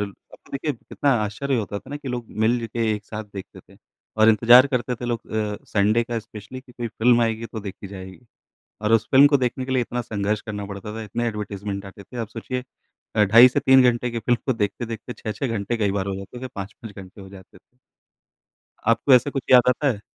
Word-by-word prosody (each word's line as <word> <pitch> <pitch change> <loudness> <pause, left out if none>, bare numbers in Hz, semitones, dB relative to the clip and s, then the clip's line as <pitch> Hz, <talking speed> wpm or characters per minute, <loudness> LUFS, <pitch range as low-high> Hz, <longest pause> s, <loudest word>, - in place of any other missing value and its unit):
अब 100 -1 -2 0.4
तो - - -20
देखिए 145 +2 -2
कितना 140 +3 -2
आश्चर्य 130 +6 -2
होता 100 -2 -3
था 130 - -15
ना 145 - -4
कि 145 -2 -8
लोग 120 -2 -4 0.2
मिल 115 +1 +1
के 115 -2 0
एक 105 -1 -7
साथ 110 0 -6
देखते 95 -1 -9
थे - - -21 0.4
और 110 0 +5
इंतज़ार 120 +4 +7
करते 125 -2 -1
थे 120 - -8
लोग 120 -2 -3
अ, 105 -1 -1
संडे 105 +3 +2
का 115 0 -3
स्पेशली 110 +3 -10
कि 130 -1 -19
कोई 120 -1 -5
फिल्म 120 +2 +3
आएगी 115 0 -1
तो 110 0 -7
देखी 100 -1 -8
जाएगी। 95 0 -10 0.6
और 105 +1 +1
उस 115 -1 +3
फिल्म 140 +2 +8
को 145 - +4
देखने 130 0 -1
के 130 - -3
लिए 130 -1 +2
इतना 120 +1 -3
संघर्ष 105 -1 -2
करना 105 -2 -5
पड़ता 100 +1 -7
था 115 - -5
इतने 115 +3 -3
एडवर्टाइज़मेंट 100 -2 -5
आते 95 +1 -11
थे। 115 - -12
आप 115 - -3
सोचिए 125 +3 -5 0.5
अ, 105 - +5
ढाई 115 +5 +8
से 125 - -1
3 130 0 +6
घंटे 120 +1 -3
की 115 - -3
फिल्म 120 +2 +1
को 130 - +3
देखते-देखते 115 +2 -4
6-6 110 +5 -4
घंटे 115 0 -2
कई 105 -3 0
बार 95 - -2
हो 100 - -2
जाते 100 +5 -9
हैं 130 +1 -6
5-5 100 +2 -8
घंटे 95 0 -11
हो 95 - -11
जाते। 95 -1 -15 1.3
आपको 115 +4 +5
ऐसा 125 +3 +4
कुछ 135 - -3
याद 125 -1 +7
आता 135 +3 +2
है? 110 -6 -1
115 Hz, 225 wpm, -23 LUFS, 105-125 Hz, 1.3 s, फिल्म